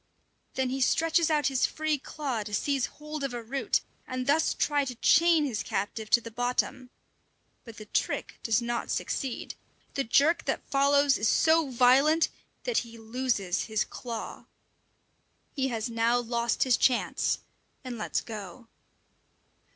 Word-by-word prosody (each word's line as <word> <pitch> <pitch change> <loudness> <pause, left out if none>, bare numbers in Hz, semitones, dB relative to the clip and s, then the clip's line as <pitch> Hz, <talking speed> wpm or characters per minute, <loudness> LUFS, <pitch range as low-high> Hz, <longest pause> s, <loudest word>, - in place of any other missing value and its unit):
Then 260 -1 0
he 265 +1 -2
stretches 330 +4 +3
out 300 -2 +1
his 270 -3 +2
free 310 -2 -1
claw 270 -5 -4
to 210 0 -4
seize 275 +3 0
hold 300 -1 -7
of 265 -3 -3
a 235 - -5
root, 265 +4 0 0.3
and 255 0 -3
thus 300 +4 +2
try 290 -1 +1
to 255 -2 -5
chain 330 +5 +4
his 235 -7 -2
captive 215 +1 -3
to 235 - +6
the 230 -1 -10
bottom. 245 +1 -1 0.8
But 230 -2 -11
the 215 - -9
trick - - -2
does 225 0 +1
not 235 0 -2
succeed. 260 -3 -3 0.4
The 275 - 0
jerk 290 +8 +3
that - - -2
follows 280 0 +3
is 215 - +2
so 320 -2 +3
violent 265 +6 +4 0.3
that - - +1
he 230 -1 -9
loses 225 -5 -1
his 220 -1 0
claw! 230 -3 -7 1.1
He 265 -2 0
has 230 -3 -2
now 230 +1 +1
lost 235 -1 0
his 255 -3 +3
chance, 250 -2 +1 0.5
and 250 -3 -6
lets 210 - -1
go. 215 +1 -9
255 Hz, 150 wpm, -28 LUFS, 230-285 Hz, 1.1 s, to